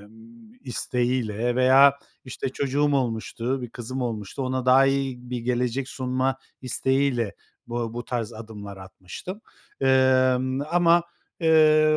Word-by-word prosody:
emm, 115 - -17
isteğiyle 120 -2 -1
veya, 135 +2 +6 0.3
işte, 130 +1 -4
çocuğum 140 +2 0
olmuştu, 125 +1 -2
bir 120 - -6
kızım 125 +2 -5
olmuştu, 110 +1 -4
ona 130 0 -2
daha 130 +1 +6
iyi 135 -3 -2
bir 125 - -2
gelecek 125 +2 -1
sunma 130 0 -1 0.3
isteğiyle 130 -4 0 0.3
bu 120 -1 -4
bu 120 - -5
tarz 120 -2 -3
adımlar 105 -3 -9
atmıştım. 95 - -9 0.4
Emm, 130 0 +3
ama, 170 0 +4 0.4
eee, 155 -1 +5
130 Hz, 120 wpm, -24 LUFS, 120-135 Hz, 0.4 s, veya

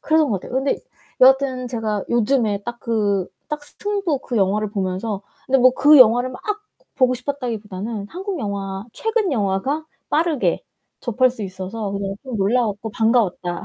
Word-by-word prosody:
그래서 315 0 +3
그런 280 - -2
것 195 -3 0
같아요. - - -10
근데 275 - +1 0.4
여하튼 260 -1 +4
제가 220 -4 -2
요즘에 225 -3 +1
딱 240 0 -5
그 205 -5 0 0.2
딱 300 -1 -3
스팅부 390 -3 -2
그 245 - -4
영화를 205 +1 +1
보면서 195 +1 -2 0.2
근데 265 0 +3
뭐 255 0 +6
그 295 0 +7
영화를 245 +1 +6
막 255 - -9 0.5
보고 255 -2 +3
싶었다기보다는 225 -6 -4
한국 380 0 -5
영화 200 -2 -4
최근 445 -7 0
영화가 225 +8 -1 0.2
빠르게 310 -3 +1 0.4
접할 250 +2 +2
수 230 -4 -7
있어서 195 +2 -5
그냥 195 0 -3
좀 255 -4 -5
놀라웠고 215 +1 0
반가웠다. 210 -7 +1
235 Hz, 345 characters per minute, -21 LUFS, 200-270 Hz, 0.5 s, 그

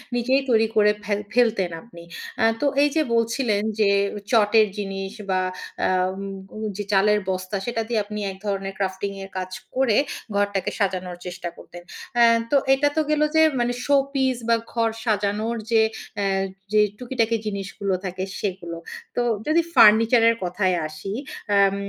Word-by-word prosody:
নিজেই 260 +3 +2
তৈরি 225 -1 +4
করে 210 -1 +5
ফেল 205 0 -1
ফেলতেন 225 -7 +2
আপনি। 170 -8 -14 0.4
আ - - +3 0.2
তো - - +1 0.2
এই 290 - +4
যে 315 - +4
বলছিলেন 230 -2 +1 0.2
যে 205 -2 +4 0.4
চটের 220 -1 +5
জিনিস 195 -1 -4 0.2
বা 185 0 +2 0.5
আব 185 0 +1 0.6
যে 205 - -2
চালের 210 +2 +4
বস্তা 185 +1 -3
সেটা 235 -1 -1
দিয়ে 235 -2 0
আপনি 210 0 -6
এক 190 - -11
ধরনের 195 -1 -2
crafting 195 0 -3
এর 195 - -9
কাজ 185 0 -4 0.2
করে 260 -5 +3 0.4
ঘরটাকে 200 -2 0
সাজানোর 185 -3 -1
চেষ্টা 180 -1 -5
করতেন। 175 - -12 0.4
আ - - +8 0.3
তো 285 - +4 0.2
এটা 290 +2 +2
তো 315 - +3
গেলো 300 0 +3
যে 315 - +6 0.2
মানে 240 0 +1
শো-পিস 275 -2 +2
বা 230 - +6 0.2
ঘর 230 -1 +2 0.2
সাজানোর 210 +2 0 0.2
যে 225 - +5 0.4
আ - - 0 0.5
যে 210 - +6 0.2
টুকিটাকি 235 -2 0
জিনিসগুলো 200 -1 -3
থাকে 185 +1 -4 0.2
সেগুলো। 180 -4 -4 0.4
তো - - +1 0.3
যদি 320 +2 +4
ফার্নিচারের 230 +2 +6
কথায় 185 +1 0
আসি, 155 +6 -7 0.4
আম 195 0 +4
210 Hz, 155 wpm, -23 LUFS, 195-235 Hz, 0.6 s, আ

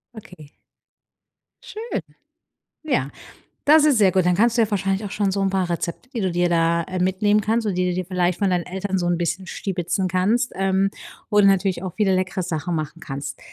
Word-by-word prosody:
Okay. 180 -8 -13 1.2
Schön. 450 +2 -5 0.8
Ja, 145 - 0 0.6
das 305 +1 +7
ist 285 -6 +4
sehr 195 -3 +5
gut. 185 -2 +2
Dann 180 0 +3
kannst 235 +3 +3
du 230 - +4
ja 215 - 0
wahrscheinlich 195 +1 -1
auch 200 - -5
schon 205 -2 0
so 195 +1 -1
'n 195 - +1
paar 190 -2 0
Rezepte, 170 +7 -4
die 230 - -2
du 185 - +1
dir 175 0 +1
da, 170 0 +2
äh, 185 0 -5
mitnehmen 205 +3 +2
kannst, 225 +1 0
oder 195 - 0
die 180 0 0
du - - -2
dir 185 -1 -3
vielleicht 180 -1 0
von 200 - +1
deinen 180 -2 0
Eltern 190 +1 -3
so 175 - -1
'n 175 -1 +1
bisschen 175 +2 -2
stibitzen 185 0 -2
kannst, 200 +7 +1
ähm, 195 0 +1 0.4
wo 210 -1 +4
du 200 - +5
natürlich 195 -2 +2
auch 185 -3 -4
viele 200 -3 +2
leckere 185 0 -1
Sachen 170 +1 -3
machen 155 +1 -4
kannst. 140 0 -6
185 Hz, 215 wpm, -22 LUFS, 175-205 Hz, 1.2 s, das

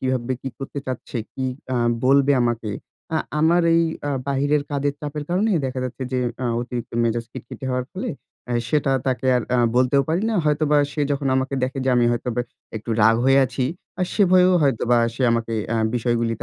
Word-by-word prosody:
কীভাবে 130 -1 -1
কি 135 - -3
করতে 135 +1 -6
চাচ্ছে, 130 0 -5 0.2
কি 130 - -4 0.2
অ্যা 130 - 0 0.3
বলবে 140 +2 +5
আমাকে। 120 -2 -1 0.4
আ - - +3 0.2
আমার 170 +2 +4
এই 165 - +4 0.3
আ - - 0 0.2
বাহিরের 145 +2 +1
কাজের 145 0 -1
চাপের 150 0 -5
কারণেই, 190 +2 +2
দেখা 130 0 -4
যাচ্ছে 125 +1 -5
যে, 130 - +1 0.2
আ - - 0
অতিরিক্ত 120 -1 -5
মেজাজ 115 0 0
খিটখটি 120 - -9
হওয়ার 125 0 -1
ফলে, 190 - -4 0.4
অ্যা 125 - -2
সেটা 145 -3 +1
তাকে 130 0 0
আর 125 - 0
আ - - +2 0.2
বলতেও 130 +2 +4
পারি 165 +5 +1
না। - - -1
হয়তোবা 150 0 +2 0.2
সে 150 - -3
যখন 140 -1 -1
আমাকে 130 +1 -1
দেখে, 130 +2 -1
যে - - 0
আমি 120 - +4
হয়তোবা 120 0 -2 0.4
একটু 110 +2 -6
রাগ 110 +1 +6
হয়ে 135 +1 +5
আছি, 130 +1 -2 0.4
আ - - +3
সে 210 - +3
ভয়েও 185 0 +6
হয়তোবা 120 -3 +2 0.2
সে 130 - -3
আমাকে 115 -1 -1
অ্যা 115 - 0 0.2
বিষয়গুলিকে 115 -1 0
130 Hz, 195 wpm, -22 LUFS, 120-145 Hz, 0.4 s, রাগ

